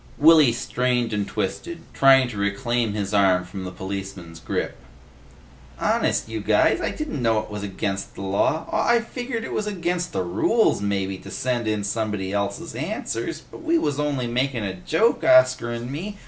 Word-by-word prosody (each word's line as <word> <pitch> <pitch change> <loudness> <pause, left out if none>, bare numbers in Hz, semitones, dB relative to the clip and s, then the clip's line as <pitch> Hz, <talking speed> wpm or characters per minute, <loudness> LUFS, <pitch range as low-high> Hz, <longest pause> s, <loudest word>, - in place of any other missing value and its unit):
Willy 155 -3 +7
strained 125 -1 -1
and 105 -1 -1
twisted, 165 - -4
trying 135 -1 +6
to 110 - -7
reclaim 115 +2 0
his 105 -1 -3
arm 95 -3 +3
from 95 +1 -7
the 90 - -5
policeman's 95 -3 -7
grip. - - -3 1.0
"Honest, - - +1
you 110 0 -4
guys. 105 - +3
I - - 0
didn't 305 - -4
know 115 -2 +2
it 110 - -11
was 105 -1 -5
against 100 0 -4
the - - -8
law. 100 +11 +1
Aw, 235 - +2
I 235 - +5
figgered 240 -1 -5
it - - -5
was 210 - -1
against 180 -3 -2
the 95 - -1
rules 100 - +2
mebbe 95 -2 -2
to - - -10
send 125 -3 -2
in 105 -1 0
somebody 105 -2 -2
else's 100 0 -2
answers, 115 +1 -3
but - - -13
we 330 +1 +2
wuz 145 - -1
only 145 -4 -1
makin' 125 0 -1
a 95 -2 -2
joke, 160 - +1
Oscar 130 -1 +5
'n' 120 +2 -5
me. 195 +8 -5
115 Hz, 180 wpm, -23 LUFS, 100-145 Hz, 1.0 s, Willy